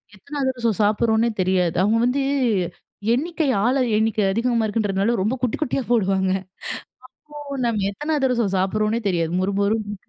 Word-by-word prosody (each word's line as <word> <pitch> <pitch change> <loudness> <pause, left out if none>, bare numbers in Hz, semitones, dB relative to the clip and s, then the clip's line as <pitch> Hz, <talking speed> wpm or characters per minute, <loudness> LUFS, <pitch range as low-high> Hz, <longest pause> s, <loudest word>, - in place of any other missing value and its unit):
எத்தனை 285 +9 -9
அதிரசம் 240 -5 -1
சாப்பிடுறோம்ன்னே 220 +2 +2
தெரியாது. 180 -2 +1
அவுங்க 210 +4 +3
வந்து 255 +3 +1 0.9
எண்ணிக்கை 320 +4 -1 0.2
ஆள 245 +4 +2 0.2
எண்ணிக்கை 220 0 +1
அதிகமா 230 +2 +1
இருக்குன்றதுனால 210 0 0
ரொம்ப 215 +7 0
குட்டி 250 -3 0
குட்டியா 275 -2 0
போடுவாங்க. 190 -4 +2 1.0
அப்போ 290 -1 -7
நம்ம 220 -4 0
எத்தனை 295 +10 -4
அதிரசம் 245 -7 +1
சாப்பிடுறோம்ன்னே 215 +4 0
தெரியாது, 170 -3 0
மொறுமொறுனு 200 +2 0
220 Hz, 130 wpm, -22 LUFS, 200-245 Hz, 1.0 s, அவுங்க